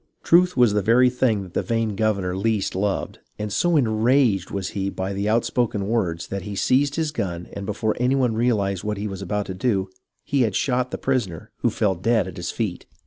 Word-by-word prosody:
Truth 180 Hz, 0 st, +4 dB
was 120 Hz, -4 st, +5 dB
the 105 Hz, -, +2 dB
very 125 Hz, +5 st, +4 dB
thing 120 Hz, -5 st, +1 dB
that 90 Hz, -2 st, -12 dB
the -, -, +1 dB
vain 115 Hz, -3 st, -1 dB
governor 100 Hz, -4 st, 0 dB
least 105 Hz, 0 st, 0 dB
loved, 100 Hz, +1 st, -2 dB, 0.2 s
and 105 Hz, -1 st, -4 dB
so 175 Hz, +5 st, +2 dB
enraged 115 Hz, -, +2 dB
was 100 Hz, -2 st, -3 dB
he 100 Hz, -1 st, -2 dB
by 95 Hz, 0 st, -4 dB
the 100 Hz, +2 st, -1 dB
outspoken 110 Hz, -2 st, 0 dB
words, 95 Hz, -7 st, -1 dB
that 100 Hz, 0 st, -3 dB
he 100 Hz, +2 st, -6 dB
seized 140 Hz, +7 st, +2 dB
his 160 Hz, -2 st, -1 dB
gun 90 Hz, -, -4 dB
and 100 Hz, 0 st, -6 dB
before 110 Hz, +1 st, -1 dB
any 125 Hz, +2 st, +2 dB
one 125 Hz, -4 st, +2 dB
realized 105 Hz, -5 st, 0 dB
what 105 Hz, -1 st, -2 dB
he 105 Hz, +1 st, -3 dB
was 95 Hz, -1 st, -6 dB
about 105 Hz, +2 st, -2 dB
to 95 Hz, -, -5 dB
do, 95 Hz, -1 st, 0 dB, 0.3 s
he 140 Hz, -1 st, 0 dB
had 110 Hz, -6 st, +1 dB
shot 125 Hz, -1 st, 0 dB
the -, -, -4 dB
prisoner, 115 Hz, -12 st, -2 dB
who -, -, +1 dB
fell 100 Hz, -2 st, +1 dB
dead 105 Hz, +2 st, +1 dB
at 90 Hz, -, -8 dB
his 85 Hz, -1 st, -4 dB
feet. 105 Hz, -6 st, -3 dB
105 Hz, 215 wpm, -23 LUFS, 95-125 Hz, 0.3 s, was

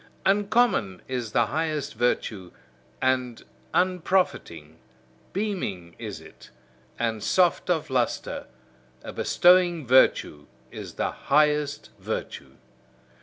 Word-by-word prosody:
Uncommon 200 Hz, -, +2 dB
is 125 Hz, -4 st, -4 dB
the 120 Hz, -, +3 dB
highest 155 Hz, +2 st, -2 dB
virtue, 105 Hz, -6 st, -1 dB, 0.5 s
and 125 Hz, -2 st, 0 dB, 0.3 s
unprofiting, 180 Hz, -, 0 dB, 0.5 s
beaming 175 Hz, -, -3 dB
is -, -, -6 dB
it, -, -, -16 dB, 0.5 s
and 110 Hz, -2 st, -1 dB
soft 180 Hz, -, +2 dB
of 160 Hz, -5 st, 0 dB
lustre: 125 Hz, -2 st, -1 dB, 0.6 s
a -, -, -7 dB
bestowing 175 Hz, -3 st, +3 dB
virtue 120 Hz, -, +3 dB, 0.2 s
is -, -, -9 dB
the -, -, -1 dB
highest 150 Hz, 0 st, +1 dB
virtue. 65 Hz, -1 st, -6 dB
140 Hz, 95 wpm, -25 LUFS, 110-180 Hz, 0.6 s, the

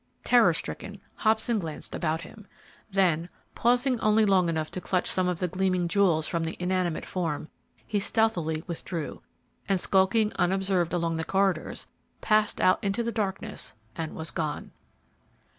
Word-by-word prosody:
Terror -, -, +5 dB
stricken, -, -, -6 dB, 0.2 s
Hobson 220 Hz, +1 st, +2 dB
glanced 160 Hz, -5 st, -6 dB
about 160 Hz, 0 st, -1 dB
him, 210 Hz, +3 st, -12 dB, 0.4 s
then 180 Hz, -4 st, +2 dB, 0.2 s
pausing 245 Hz, +1 st, +2 dB
only 215 Hz, 0 st, +4 dB
long 185 Hz, -4 st, +3 dB
enough 160 Hz, -1 st, -2 dB
to 185 Hz, -, -5 dB
clutch 180 Hz, 0 st, 0 dB
some 185 Hz, -1 st, +1 dB
of 180 Hz, -1 st, 0 dB
the 180 Hz, -, -1 dB
gleaming 185 Hz, 0 st, 0 dB
jewels 170 Hz, -4 st, +3 dB
from 165 Hz, -1 st, -1 dB
the 165 Hz, +1 st, -4 dB
inanimate 180 Hz, -2 st, -1 dB
form, 160 Hz, -4 st, -3 dB, 0.4 s
he 210 Hz, -, 0 dB
stealthily 180 Hz, -8 st, 0 dB
withdrew, 170 Hz, -2 st, -5 dB, 0.5 s
and, 195 Hz, -1 st, +3 dB
skulking 195 Hz, +4 st, +3 dB
unobserved 185 Hz, -1 st, +1 dB
along 165 Hz, -2 st, 0 dB
the 160 Hz, -, -2 dB
corridors, 190 Hz, -2 st, 0 dB, 0.3 s
passed 215 Hz, -1 st, +2 dB
out 185 Hz, -, +3 dB
into 200 Hz, +4 st, 0 dB
the 235 Hz, -, -1 dB
darkness 205 Hz, -, -3 dB, 0.2 s
and 160 Hz, -1 st, -4 dB
was 160 Hz, 0 st, -4 dB
gone. 155 Hz, -3 st, -3 dB
185 Hz, 150 wpm, -27 LUFS, 165-205 Hz, 0.5 s, Terror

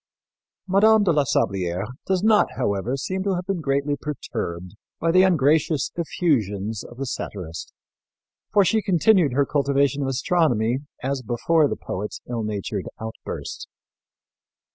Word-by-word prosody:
Mme. 210 Hz, +3 st, +5 dB
de 185 Hz, -, +3 dB
la 150 Hz, -3 st, +2 dB
Sablière 95 Hz, -5 st, 0 dB, 0.2 s
does 190 Hz, 0 st, +1 dB
not, 215 Hz, -1 st, +5 dB
however, 100 Hz, +6 st, -1 dB
seem 190 Hz, +8 st, -3 dB
to 195 Hz, -1 st, 0 dB
have 180 Hz, 0 st, -4 dB
been 190 Hz, -3 st, -2 dB
greatly 140 Hz, 0 st, 0 dB
perturbed 100 Hz, -, -5 dB, 0.3 s
by 165 Hz, -, +1 dB
the 185 Hz, +2 st, +6 dB
ungracious 155 Hz, -4 st, +2 dB
effusions 110 Hz, -, -1 dB
of 120 Hz, -, -12 dB
the 135 Hz, -, -3 dB
satirist, 90 Hz, -9 st, -6 dB, 0.8 s
for 205 Hz, -2 st, +5 dB
she 220 Hz, +5 st, +2 dB
continued 185 Hz, -, +3 dB
her 140 Hz, +2 st, +3 dB
cultivation 140 Hz, 0 st, +1 dB
of 135 Hz, -, -1 dB
astronomy 130 Hz, -4 st, +1 dB, 0.2 s
as 135 Hz, 0 st, -1 dB
before 145 Hz, +7 st, +2 dB
the -, -, -2 dB
poet's 105 Hz, +3 st, -5 dB
ill 120 Hz, -2 st, -3 dB
natured 105 Hz, -2 st, -3 dB
outburst. 110 Hz, 0 st, -6 dB
140 Hz, 140 wpm, -23 LUFS, 110-175 Hz, 0.8 s, the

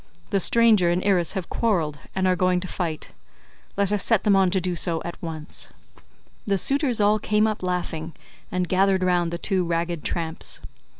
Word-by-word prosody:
The 200 Hz, -, +2 dB
stranger 215 Hz, -3 st, +5 dB
and 175 Hz, +1 st, 0 dB
Irus 185 Hz, -4 st, +2 dB
have 190 Hz, -4 st, -4 dB
quarreled 165 Hz, -10 st, -1 dB, 0.2 s
and 190 Hz, 0 st, 0 dB
are 185 Hz, 0 st, +3 dB
going 180 Hz, 0 st, +2 dB
to 185 Hz, -, -5 dB
fight, 165 Hz, -4 st, -4 dB, 0.7 s
let 200 Hz, -1 st, +1 dB
us 210 Hz, -2 st, 0 dB
set 225 Hz, -4 st, +3 dB
them 205 Hz, -2 st, +4 dB
on 190 Hz, -1 st, +4 dB
to 190 Hz, +1 st, +1 dB
do 180 Hz, 0 st, -2 dB
so 165 Hz, 0 st, 0 dB
at 170 Hz, -, -7 dB
once." 160 Hz, -2 st, -6 dB, 0.8 s
The 200 Hz, -1 st, +2 dB
suitors 270 Hz, -, +1 dB
all 210 Hz, +1 st, +3 dB
came 210 Hz, 0 st, +1 dB
up 215 Hz, -1 st, -2 dB
laughing, 170 Hz, -3 st, -3 dB, 0.4 s
and 180 Hz, -1 st, -1 dB
gathered 190 Hz, +1 st, +2 dB
round 175 Hz, -2 st, +1 dB
the 170 Hz, -, -3 dB
two 185 Hz, +1 st, +1 dB
ragged 170 Hz, -1 st, -2 dB
tramps. 165 Hz, -2 st, -3 dB
185 Hz, 185 wpm, -24 LUFS, 170-200 Hz, 0.8 s, stranger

